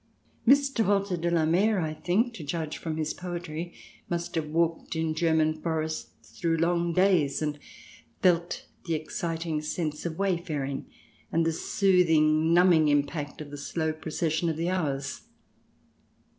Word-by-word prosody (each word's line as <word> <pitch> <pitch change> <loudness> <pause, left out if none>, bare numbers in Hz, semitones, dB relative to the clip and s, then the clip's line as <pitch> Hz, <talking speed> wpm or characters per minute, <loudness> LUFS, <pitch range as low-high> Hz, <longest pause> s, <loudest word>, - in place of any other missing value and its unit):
Mr. 275 -2 +4
Walter 200 -2 +1
de 170 0 -1
la 165 -2 +2
Mare, 195 +6 +3
I 155 -2 -1
think, 210 +10 0
to 175 - -8
judge 155 +1 -3
from 160 -2 -4
his 155 -1 -1
poetry, 175 -1 -5 0.4
must 175 0 -3
have 160 -2 -1
walked 165 +2 0
in 160 -1 0
German 155 -1 +1
forests 160 -1 -4
through 165 -1 +1
long 170 +1 +1
days, 170 -6 +3
and 150 -1 -2 0.6
felt 175 -1 +2 0.2
the 165 - +1
exciting 160 0 -3
sense 155 -1 -3
of 165 -2 -4
wayfaring 165 -8 -2 0.4
and 165 0 +2
the 165 - +1
soothing, 160 -4 +3
numbing 170 -3 +5
impact 145 +1 0
of 145 -1 -8
the 145 - -7
slow 160 +2 -2
pro 155 0 -8
cession 160 +1 0
of 160 - -2
the 170 +2 0
hours. 140 -7 -2
165 Hz, 150 wpm, -28 LUFS, 155-175 Hz, 0.6 s, numbing